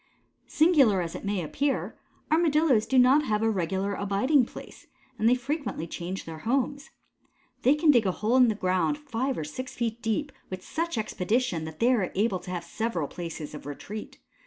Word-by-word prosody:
Singular 285 - +4
as 165 - -5
it - - -7
may 200 -3 -1
appear, 275 - -1 0.4
Armadillos 305 -8 +3
do 265 - +2
not 260 +4 +6
have 215 -2 0
a 225 - +3
regular 190 +1 -1
abiding 210 +8 +2
place, - - -12 0.3
and 220 +2 +4
they 250 - +5
frequently 275 - -3
change 175 +3 -5
their 160 -1 -8
homes. 275 - -1 0.7
They 270 +4 +4
can 300 0 +5
dig 235 -7 +3
a - - +2
hole 215 +6 0
in 250 -1 +7
the 220 - +1
ground 185 +8 +1
five 270 -2 -2
or - - -2
six 255 +12 -7
feet 235 -1 -2
deep 255 +5 -1 0.2
with 185 0 -7
such 335 -4 -2
expedition 210 -3 -1
that 160 0 -8
they 245 +2 +4
are 205 -7 0
able 195 -1 +1
to - - -11
have 175 -2 -3
several 175 -3 -2
places 165 -3 -7
of 150 - -9
retreat. 205 +9 -7
225 Hz, 185 wpm, -27 LUFS, 185-265 Hz, 0.7 s, in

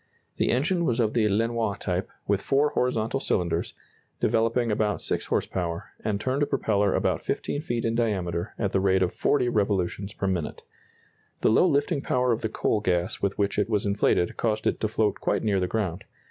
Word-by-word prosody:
The - - +1
engine 170 +8 +1
was 125 -7 +1
of 110 -2 +2
the 110 -3 +3
Lenoir 110 0 0
type, 90 -1 -2 0.2
with 100 -1 +1
four 140 +5 +2
horizontal 125 -2 0
cylinders, 85 -8 -1 0.4
developing 115 +1 +1
about 105 -1 0
6 - - -2
horse - - +1
power, 85 -2 -4
and 105 -2 -1
turned 130 +5 -1
a 145 - +2
propeller 105 -7 +1
about - - 0
15 145 - -2
feet 120 -6 -2
in 115 - +1
diameter 95 -6 -1
at 100 -4 -1
the 95 - +2
rate 95 0 +3
of 90 - -1
40 130 -4 +1
revolutions 100 -2 0
per - - -3
minute. 90 -5 -2 0.8
The - - +4
low 145 - +5
lifting 145 0 +1
power 125 -2 +1
of 115 - 0
the 110 - -1
coal 110 - 0
gas 90 -2 0
with 100 -1 -1
which 100 0 0
it 105 - +1
was 105 -2 0
inflated 100 -3 +1
caused 110 -1 -1
it - - +1
to 110 - 0
float 110 -1 0
quite - - 0
near 100 -3 +2
the 90 - 0
ground. 95 -4 -2
105 Hz, 200 wpm, -26 LUFS, 95-120 Hz, 0.8 s, low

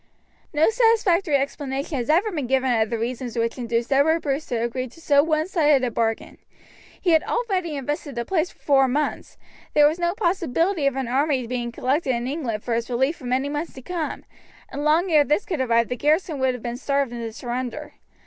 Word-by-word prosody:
No 310 +8 +3
satisfactory 420 -8 +3
explanation 275 +1 -2
has 245 0 -3
ever 365 +8 +3
been 295 -8 -3
given 260 0 +2
of 220 -2 +1
the 230 - -1
reasons 240 +1 -4
which 230 +2 -1
induced 235 +1 -1
Edward 320 +4 +3
Bruce 285 +1 -2
to 245 - -2
agree 235 +3 -2
to 255 - -17
so 285 -3 +4
one 310 0 0
sided 300 -7 +3
a 245 - 0
bargain. 225 0 -2 0.6
He 355 - +1
had 320 -1 +5
already 375 -9 -2
invested 285 +1 -4
the 235 0 -3
place 355 -1 0
for - - -21
four 270 -2 +3
months, 290 +4 -2 0.4
there 295 -1 +7
was 315 +4 -1
no 345 +1 0
possibility 340 - +1
of 275 - 0
an 265 -2 -2
army 270 0 +1
being 240 0 -3
collected 260 +2 0
in 235 0 -3
England 255 -6 -3
for 240 - -2
its 230 +1 -2
relief 265 +6 0
for 265 - -12
many 255 +3 0
months 295 +3 -4
to 260 - -11
come, 335 +1 -4 0.5
and 290 - -4
long 325 +4 +2
ere 300 -2 +6
this 300 +7 0
could 330 -7 -2
arrive 235 -2 +2
the 250 - -3
garrison 305 +2 +1
would 260 -1 +1
have 245 - -10
been 240 0 -4
starved 275 -2 -1
into 230 -1 -5
surrender. 250 +5 -5
280 Hz, 210 wpm, -23 LUFS, 245-320 Hz, 0.6 s, there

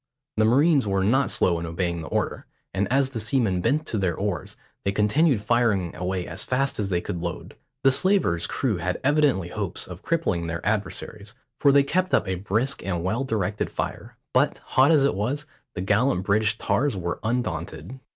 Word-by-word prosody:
The 110 - +4
marines 140 +2 +4
were 95 -1 +1
not 130 +8 +2
slow 85 -2 +2
in 85 - -4
obeying 85 0 -2
the 80 - -7
order, - - -2 0.3
and 100 +3 -1
as 135 0 +2
the 120 - -4
seamen 110 -5 +1
bent 155 - +1
to 110 - -2
their 90 -4 0
oars, 100 -5 -3 0.3
they 100 - +1
continued 110 +5 +2
firing 105 -6 +1
away 90 0 -2
as 85 +7 -5
fast 135 0 -1
as 100 -2 -1
they 90 -2 0
could 85 - -5
load. 85 0 -5 0.3
The 135 - +6
slaver's 130 - +2
crew - - -1
had - - -2
evidently 140 - +2
hopes 100 0 -4
of 90 +1 -10
crippling 105 - -1
their 85 +1 -4
adversaries, 105 +1 -3 0.2
for 140 - +5
they 140 0 +5
kept 185 +6 +1
up - - +1
a 95 - 0
brisk 105 +9 -1
and 90 -3 -2
well 110 +8 0
directed 105 -5 -1
fire; - - -5 0.2
but, - - +2 0.2
hot 130 +2 +5
as 150 -4 +5
it 140 - +2
was, 130 +9 -2 0.3
the 90 - -3
gallant 105 0 +2
British 105 +2 +1
tars 135 -6 0
were 85 -1 -3
undaunted. 115 +1 -3
105 Hz, 190 wpm, -25 LUFS, 90-135 Hz, 0.3 s, The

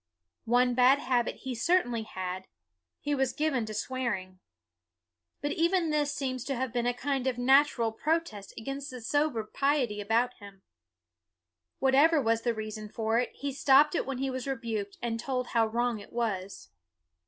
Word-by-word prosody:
One 245 +1 +3
bad 255 +2 +5
habit 250 -4 0
he 260 -1 -4
cer 345 +10 +3
tainly 230 -3 -4
had: 185 -1 -5 0.5
he 290 - -1
was 265 -2 +1
given 275 -7 0
to 215 - -5
swearing. 205 -6 -3 1.0
But 290 - -1
even 335 0 +1
this 295 -1 +1
seems 260 -4 -3
to 275 - -2
have 255 -1 -3
been 240 -1 0
a 245 - +2
kind 270 0 -1
of 255 -2 0
natural 260 -2 +4
protest 285 -6 -2
against 275 +5 -5
the 255 - -7
sober 285 0 0
piety 250 -3 0
about 230 +4 +1
him. 200 -2 -13 1.1
Whatever 285 +4 +4
was 230 -3 +1
the 235 -1 0
reason 215 0 -6
for 225 +1 0
it, 245 - -1
he 280 -1 -4
stopped 280 +2 +5
it 345 - -1
when 270 -2 -3
he 270 +1 -1
was 260 0 -4
rebuked 225 -6 -3
and 230 -1 -2
told 250 0 -2
how 230 -2 +2
wrong 235 0 0
it - - -13
was. 200 -5 -3
245 Hz, 170 wpm, -29 LUFS, 225-275 Hz, 1.1 s, bad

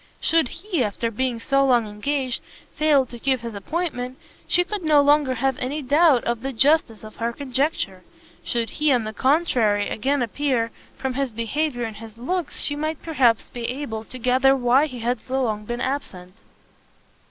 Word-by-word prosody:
Should 325 -4 +3
he, 345 - -2
after 230 +3 -2
being 245 +1 -1
so 275 +4 +2
long 245 -4 +3
engaged, 255 +5 -2 0.3
fail 300 -3 +3
to 240 -1 -11
keep 260 0 +1
his 235 -1 -6
appointment, 255 - -3 0.3
she 355 - +3
could 410 +2 -4
no 310 -3 +4
longer 285 -2 +4
have 265 +2 0
any 285 +4 -3
doubt 290 -1 +4
of 235 -1 -1
the 270 +2 -3
justice 265 -3 +2
of 215 0 -11
her 230 +1 -1
conjecture; 260 - -1 0.4
should 235 -1 -2
he, 300 -1 +1
on 245 -3 +3
the 215 0 -5
contrary, 245 -8 +2
again 270 +4 0
appear, 240 -1 -1 0.3
from 265 -1 -2
his 275 -1 -1
behaviour 245 +4 -2
and 225 -2 -5
his 225 0 -11
looks 345 +7 -3
she 290 - 0
might 310 +1 -3
perhaps 255 -8 +2
be 240 -1 -5
able 240 -4 -4
to 255 - -9
gather 255 +2 +3
why 260 +3 +3
he 250 -5 -8
had 240 +1 0
so 265 0 -1
long 210 -3 -2
been 240 +2 -4
absent. 185 -10 -4
255 Hz, 180 wpm, -23 LUFS, 230-290 Hz, 0.4 s, no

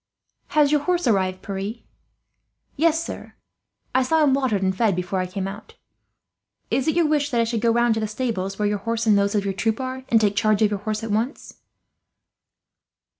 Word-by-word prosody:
"Has 295 -1 +5
your 300 -1 +3
horse 355 +2 0
arrived, 190 -5 +1
Pierre?" 200 +2 -4 1.0
"Yes, 325 +2 +2
sir. - - -8 0.6
I 260 - +3
saw 315 +5 +2
him 280 -3 +4
watered 255 -8 +1
and 190 0 +1
fed 215 -3 +2
before 180 +1 -2
I 185 - -1
came 190 +1 -4
out. 200 +2 -9 1.0
Is 265 - 0
it 315 - +2
your 340 -1 +3
wish 295 -1 +1
that 240 - 0
I - - +4
should 230 -1 -2
go 235 - +3
round 235 0 +3
to 220 - -2
the 215 - -1
stables 210 -4 -3
where 210 - +1
your 205 0 -1
horse 230 +2 -2
and 215 -2 +5
those 200 +1 +1
of 200 -1 0
your 195 - -1
troop 220 +4 -1
are, 260 0 -4
and 225 - +5
take 205 -2 +1
charge 215 0 +2
of 210 - +3
your 205 - -2
horse 215 +2 -3
at 225 - -4
once?" 225 +7 -3
220 Hz, 210 wpm, -23 LUFS, 200-260 Hz, 1.0 s, Has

